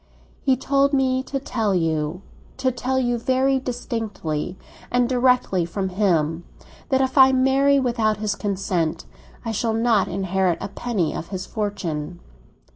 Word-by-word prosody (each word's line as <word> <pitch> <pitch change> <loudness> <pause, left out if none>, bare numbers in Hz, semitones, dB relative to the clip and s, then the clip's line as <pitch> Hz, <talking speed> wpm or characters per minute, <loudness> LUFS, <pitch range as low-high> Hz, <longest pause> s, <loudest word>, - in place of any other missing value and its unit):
"He 265 -2 +2
told 275 +2 +2
me 260 -1 +2
to 275 +1 -4
tell 225 -7 -1
you—to 165 - -2
tell 255 +2 -2
you 240 -2 +1
very 265 +2 +2
distinctly, 225 - -4 0.3
and 245 0 +2
directly 250 -7 +2
from 190 +3 -3
himself, 170 -5 +1 0.5
that 265 -2 +3
if 265 +1 +1
I 265 0 +8
marry 270 +2 +3
without 230 -5 +1
his 210 -1 -1
consent, 190 -5 -2 0.4
I 225 - -1
shall 225 +1 -1
not 225 -3 +2
inherit 190 -1 0
a 195 - -5
penny 200 -6 -2
of 170 - -5
his 190 -2 -5
fortune. 175 -6 -4
225 Hz, 140 wpm, -23 LUFS, 185-260 Hz, 0.5 s, I